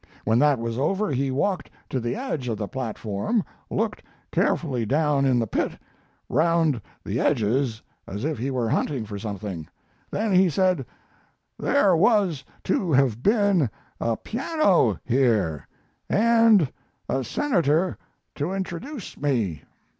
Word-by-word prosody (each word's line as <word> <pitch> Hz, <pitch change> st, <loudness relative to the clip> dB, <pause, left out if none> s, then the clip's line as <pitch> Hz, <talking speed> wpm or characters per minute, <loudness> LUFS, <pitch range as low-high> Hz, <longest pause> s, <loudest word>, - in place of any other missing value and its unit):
When 110 Hz, +2 st, +3 dB
that 145 Hz, -1 st, +4 dB
was 115 Hz, +1 st, -3 dB
over 195 Hz, +5 st, 0 dB
he 135 Hz, 0 st, 0 dB
walked 180 Hz, +9 st, -1 dB, 0.2 s
to 130 Hz, -, 0 dB
the 120 Hz, 0 st, -2 dB
edge 220 Hz, -, -3 dB
of 115 Hz, -3 st, -1 dB
the 105 Hz, -, -3 dB
platform, 120 Hz, -, -2 dB, 0.3 s
looked -, -, -1 dB, 0.3 s
carefully 130 Hz, -8 st, +1 dB
down 145 Hz, +3 st, +2 dB
in 130 Hz, -2 st, +3 dB
the 115 Hz, -, +1 dB
pit, -, -, -1 dB, 0.5 s
round 160 Hz, -3 st, +2 dB, 0.2 s
the 110 Hz, +5 st, -2 dB
edges 115 Hz, -1 st, +1 dB, 0.2 s
as 100 Hz, +6 st, -4 dB
if 155 Hz, -6 st, -2 dB
he 130 Hz, +4 st, -1 dB
were 125 Hz, -3 st, -1 dB
hunting 120 Hz, +1 st, 0 dB
for 100 Hz, -1 st, -6 dB
something. 100 Hz, -6 st, -5 dB, 0.4 s
Then 215 Hz, -1 st, -1 dB
he 185 Hz, 0 st, +5 dB
said: 180 Hz, -5 st, +1 dB, 0.7 s
'There 200 Hz, -11 st, +3 dB
was 185 Hz, -, +3 dB, 0.2 s
to 185 Hz, -2 st, 0 dB
have 130 Hz, -5 st, +3 dB
been 200 Hz, -, +3 dB, 0.3 s
a 115 Hz, -1 st, 0 dB
piano 220 Hz, -, +2 dB
here, 115 Hz, -, +1 dB, 0.4 s
and 225 Hz, -, +5 dB, 0.4 s
a 135 Hz, -, 0 dB
senator 175 Hz, -, +1 dB, 0.4 s
to 155 Hz, +6 st, -2 dB
introduce 195 Hz, -, -5 dB
me. 115 Hz, -, 0 dB
140 Hz, 135 wpm, -25 LUFS, 115-185 Hz, 0.7 s, he